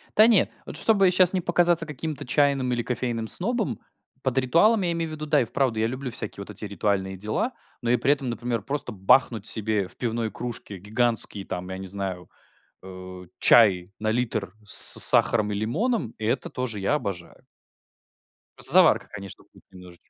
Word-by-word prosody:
Да 215 +1 +6
не, 225 -5 +2 0.2
вот - - -6
чтобы 195 -4 +2
сейчас 185 0 +3
не 185 - -1
показаться 170 -1 +1
каким-то 150 -1 -7
чайным 135 -1 0
или 120 -1 -3
кофейным 120 -2 -4
снобом, 200 - -2 0.4
под 130 -1 -3
ритуалом 170 - +2
я 175 - -1
имею 165 -1 -4
в - - -8
виду, 155 0 -7
да, 150 -1 +2
и - - -2
вправду 120 -2 -2
я 110 - 0
люблю 130 +2 -6
всякие 110 -3 -7
вот 100 - -11
эти - - -9
ритуальные 100 -1 -3
дела, 110 - -4 0.3
но 120 - -1
и - - +3
при 135 - 0
этом, 135 -3 -6
например, 120 -2 -4
просто 140 -1 -5
бахнуть 110 +2 +1
себе 110 -3 0
в - - -14
пивной 115 -2 -4
кружке 105 -2 -8
гигантский, 110 0 -2
там, 90 +1 -7
я 95 - -7
не 95 - -9
знаю, 95 -2 -5 0.5
э, 90 -1 -12
чай 95 -5 +3
на 110 0 -3
литр 110 -5 -3
с 105 - +10
сахаром 105 -3 +6
и - - -3
лимоном. 125 - -3
И 110 - -7
это 125 +3 -3
тоже 115 -5 -5
я 100 +9 -1
обожаю. 100 - -8 1.1
Просто - - 0
заварка, - - +3
конечно, 100 -1 -11
будет - - -22
немнож 90 -2 -15
115 Hz, 185 wpm, -23 LUFS, 100-145 Hz, 1.1 s, с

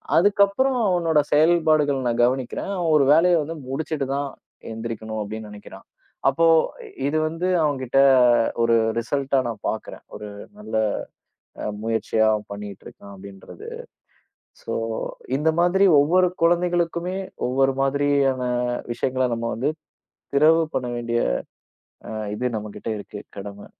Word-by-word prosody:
அதுக்கப்புறம் 200 +8 +3
அவனோட 165 -4 +2
செயல்பாடுகள் 155 -3 +3
நான் 120 0 +1
கவனிக்கிறேன், 130 +9 -2
"அவன் 170 -3 0
ஒரு 140 - +4
வேலைய 175 +3 +5
வந்து 165 +3 -6
முடிச்சிட்டுதான் 140 -1 -2 0.4
எந்திரிக்கணும்." 110 -1 -5
அப்டின்னு 110 +1 -7
நெனைக்குறான். 100 -2 -12 0.4
அப்போ 165 +5 +2 0.6
இது 155 +2 0
வந்து 165 +3 -3 0.2
அவன்கிட்ட 135 -3 0 0.6
ஒரு 115 0 +3 0.2
ரிசல்டா 135 +3 0
நான் 110 -3 -6
பாக்குறேன். 110 - -6
ஒரு 105 - -7 0.3
நல்ல 210 - -6 0.9
அ - - -3 0.2
முயற்சியா 115 -1 0
அவன் 105 -1 -2
பண்ணிட்டு 100 -1 -8
இருக்கான் 100 0 -12
அப்படின்றது. 95 0 -11 0.9
சோ, - - -4 0.6
இந்த 160 +2 +2
மாதிரி 190 +3 +4
ஒவ்வொரு 180 +5 +3
குழந்தைகளுக்குமே, 175 +1 +1 0.3
ஒவ்வொரு 135 +1 +2
மாதிரியான 135 -2 +1 0.5
விஷயங்கள 130 +1 0
நம்ம 115 0 -3
வந்து 135 +7 0 0.6
திறவு 160 +3 +5
பண்ண 125 - -1
வேண்டிய 120 0 -1 0.9
அ - - -5 0.2
இது 125 - -2
நம்மகிட்ட 105 +1 -8
இருக்கு 105 0 -9 0.2
கடமை. 100 +1 -8
135 Hz, 120 wpm, -23 LUFS, 115-165 Hz, 0.9 s, வேலைய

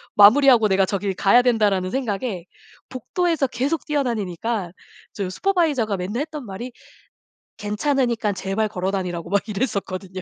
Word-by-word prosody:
마무리하고 230 +2 +7
내가 195 -1 +3
저기를 200 0 -2
가야 200 +6 +5
된다.'라는 210 -7 +1
생각에 220 -7 -3 0.4
복도에서 325 +3 -1
계속 265 +6 -2
뛰어다니니까 225 - -2 0.4
저 195 -3 -3
슈퍼바이저가 290 - 0
맨날 200 +8 -3
했던 300 -3 -6
말이 220 +5 -7 0.9
괜찮으니깐 230 -1 0
제발 195 +3 -1
걸어다니라고 180 -3 -3
막 200 0 +3
이랬었거든요. 195 -4 -3
215 Hz, 375 characters per minute, -22 LUFS, 195-260 Hz, 0.9 s, 마무리하고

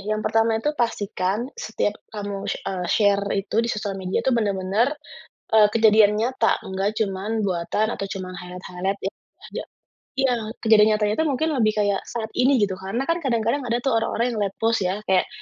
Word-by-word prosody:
yang 215 - -4
pertama 225 +1 +2
itu 295 +7 0
pastikan 205 -2 -1 0.2
setiap 205 - -1 0.2
kamu 205 -2 -5
sh - - -1
eee, 180 -2 -3
share 200 -1 +3
itu, 195 +1 -3
di 230 - +1
sosial 205 -3 -3
media 185 0 -1
itu, 265 - +2
benar-benar, 210 +4 +1 0.6
eee, 210 -1 +7
kejadian 215 -2 +5
nyata, 255 +3 +1
nggak 195 +2 0
cuma 200 +1 -1
buatan 190 +2 0
atau 195 - -4
cuma 185 -1 -6
highlight-highlight, 180 +2 -4
yang - - -15 0.3
tidak - - -6 0.5
iya, 265 -2 +3 0.3
kejadian 220 -1 +6
nyatanya 210 0 +1
itu 320 - +2
mungkin 315 +5 0
lebih 215 -1 +3
kayak 205 -1 +2
saat 225 -2 -4
ini 260 +2 +4
gitu. 195 -2 -2
Karena 220 +8 -2
kan 335 +1 0
kadang-kadang 235 +1 0
ada 235 - +1
tuh 270 - +2
orang-orang 235 +2 0
yang - - -3
late 195 -1 -2
post, 225 -1 +1
ya, 185 +2 0
kayak 190 -2 +2
210 Hz, 185 wpm, -23 LUFS, 195-230 Hz, 0.6 s, eee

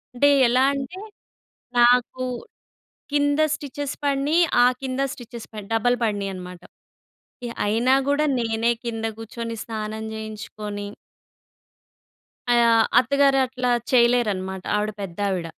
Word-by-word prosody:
అంటే 285 +4 +4 0.2
ఎలా 250 +2 +3
అంటే, 280 +7 -5 0.8
నాకు 245 +1 +4 0.9
కింద 290 0 +2
స్టిచెస్ 290 -1 -5
పడినయి, 285 +4 +2 0.2
ఆ - - +7 0.2
కింద 260 0 -2
స్టిచెస్ 235 -1 -10
పడి 210 -2 -8
డబల్ 245 +2 +2
పడినియన్నమాట. 190 -4 -4 0.9
యాహ్! 235 - -8
అయినా 235 +5 +3
కూడా 285 +2 +2 0.2
నేనే 225 0 +1
కింద 225 -1 -4
కూర్చుని 230 +1 -6
స్నానం 220 -1 -5
చేయించుకోని 210 -1 -6 1.7
ఆహ్, 230 -1 +5 0.2
అత్తగారు 275 +2 +3
అట్లా 250 -1 -1 0.2
చేయలేరన్నమాట. 215 -7 +2
ఆవిడ 210 +1 0
పెద్దావిడ. 190 -1 -2
235 Hz, 105 wpm, -23 LUFS, 215-260 Hz, 1.7 s, ఆ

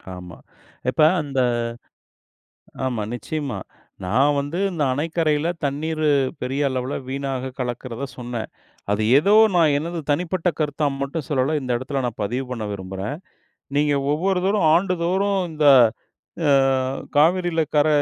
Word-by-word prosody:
ஆமா. 90 -1 -10 0.5
இப்ப 155 - 0 0.2
அந்த 140 -3 -3 1.5
ஆமா, 120 -5 -1
நிச்சயமா. 140 -2 -4 0.5
நான் 135 +10 +3
வந்து 145 +6 -2
இந்த 165 -4 -1
அணைக்கரையில 155 +1 0 0.2
தண்ணீர் 155 +3 -2 0.4
பெரிய 130 +3 -2
அளவில 130 +1 -3 0.2
வீணாக 135 -1 -3
கலக்கிறதை 125 +1 -4
சொன்னேன். 120 -2 -5 0.4
அது 105 +1 +1
ஏதோ 195 +8 +3 0.2
நான் 160 -4 +4
எனது 165 +3 -3
தனிப்பட்ட 175 +3 0
கருத்தா 150 0 0
மட்டும் 140 +2 -3
சொல்லல்ல. 140 +2 +1
இந்த 125 -2 -3
இடத்தில் 135 +1 -3
நான் 120 -2 -5
பதிவு 125 +6 -2
பண்ண 115 -4 -3
விரும்புறேன். 95 +6 -5 0.6
நீங்க 145 0 +2 0.2
ஒவ்வொரு 185 +3 0
தோறும் 200 -5 +2
ஆண்டுதோறும் 190 +2 +1
இந்த 150 -1 +2 0.8
அ - - +4 0.7
காவிரியில 170 +2 +3
கர 150 +1 +4
145 Hz, 125 wpm, -22 LUFS, 130-165 Hz, 1.5 s, நான்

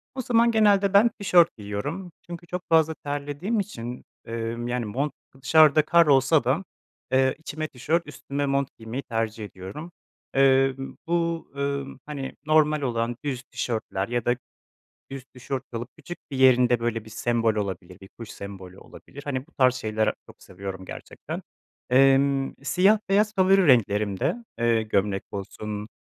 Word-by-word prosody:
O 260 - -2
zaman 235 -1 +3
genelde 205 -3 +4
ben 205 +4 +6
tişört 180 - +3
giyiyorum 140 - -5 0.2
çünkü 175 0 -8
çok 180 +1 -4
fazla 160 -1 +4
terlediğim 145 +9 -3
için, 125 - -6 0.2
emm, 115 +1 -4
yani 120 -1 -2
mont 135 +7 -2 0.3
dışarıda 155 +2 +6
kar 170 +1 +5
olsa 140 +1 +4
da, 135 +9 +1 0.5
eee, 130 0 +3
içime 155 0 -5
tişört 155 +6 -1
üstüme 145 0 -4
mont 140 0 +1
giymeyi 115 +4 -6
tercih 115 -1 -3
ediyorum. 100 - -9 0.4
Eee, 135 0 +4 0.3
bu, 170 -1 -1
ımm, 140 -1 -3
hani 140 -3 -5
normal 155 -1 +3
olan 120 -2 -1
düz 130 -3 -3
tişörtler 110 -7 -3
ya 120 -1 -2
da 120 - +3 0.8
düz 135 -2 -7
tişört 130 0 -6
alıp 120 +1 -5
küçük 165 +3 -9
bir 135 - -4
yerinde 125 -2 +5
böyle 115 -2 -2
bir 110 - -13
sembol 115 0 +1
olabilir, 95 -3 -5
bir 95 - -13
kuş 115 - -8
sembolü 95 -2 -9
olabilir. 145 - -13
Hani 135 -2 -3
bu 170 - -27
tarz 130 -3 +3
şeyler 110 -3 -1
çok - - -17
seviyorum 95 0 -8
gerçekten. - - -8 0.5
Emm, 135 +1 +4
siyah 190 +9 +4
beyaz 210 +2 +2
favori 190 -1 +4
renklerimde, 105 - +2 0.2
eee, 115 -1 +2
gömlek 100 -2 0
olsun, 105 +2 -6
135 Hz, 150 wpm, -25 LUFS, 115-155 Hz, 0.8 s, ben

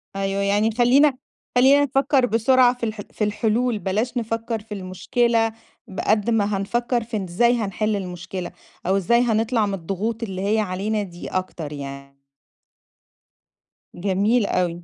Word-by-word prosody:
أيوه 195 0 -1
يعني 205 +2 +2
نخلّينا، 255 +5 +4 0.4
خلينا 270 +3 +6
نفكّر 270 -1 +2
بسرعة 245 +2 +4
في - - -14
الحل 215 -2 -4
في 215 - -3
الحلول 220 +2 0
بلاش 220 +6 -1
نفكّر 225 0 -2
في 210 0 -10
المشكلة، 225 +4 0 0.3
ب 190 - -8
قد 215 +1 +1
ما 210 -3 +1
هنفكّر 240 +4 -1
في 225 -1 -4
إن 195 - -3
إزاي 235 +8 +2
هنحِلّ 215 0 -1
المشكلة، 185 -1 -5 0.3
أو 190 +2 +2
إزاي 215 +5 +3
هنطلع 225 -1 +1
من 200 - -3
الضغوط 200 +6 -3
اللي 190 -3 -4
هي 220 - +2
علينا 205 +2 -1
دي 175 -2 -9
أكتر 175 -5 -4
يعني. 140 -1 -8 1.8
جميل 200 +5 +1
أوي 175 -2 -1
215 Hz, 145 wpm, -22 LUFS, 190-235 Hz, 1.8 s, خلينا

